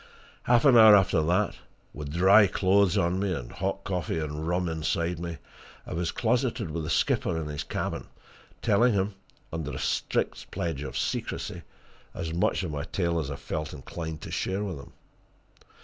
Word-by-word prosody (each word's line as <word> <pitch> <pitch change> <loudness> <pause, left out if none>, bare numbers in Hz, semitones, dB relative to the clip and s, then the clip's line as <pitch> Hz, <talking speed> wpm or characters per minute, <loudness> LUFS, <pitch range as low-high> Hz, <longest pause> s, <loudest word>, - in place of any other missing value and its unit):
Half 120 +1 +4
an 135 -3 +7
hour 110 -2 +10
after 95 -4 +3
that, 90 +6 +1 0.4
with 75 -1 -6
dry 95 +5 +6
clothes 95 -1 +3
on 85 +2 +1
me, 95 -3 0
and - - -7
hot 95 +2 -3
coffee 90 -3 -2
and 75 0 -3
rum 90 +1 0
inside 85 +1 -1
me, 85 -1 -5 0.5
I - - -6
was 85 0 -1
closeted 120 - 0
with 80 +1 -3
the - - -4
skipper 80 - +1
in 80 - -4
his 75 -1 -4
cabin, - - -4 0.6
telling 115 +4 +4
him, 100 +1 0 0.4
under 80 -3 -3
a - - -4
strict - - -1
pledge 80 -5 -3
of 65 -4 -5
secrecy, - - -3 0.5
as 85 -2 -4
much 90 +2 +1
of 85 - -3
my 75 0 -4
tale 85 -3 -1
as 75 -4 -3
I 70 - -4
felt 75 +2 -5
inclined 80 +3 -6
to - - -8
share 95 +2 -1
with 95 -8 -4
him. 70 - -13
85 Hz, 180 wpm, -27 LUFS, 80-95 Hz, 0.6 s, hour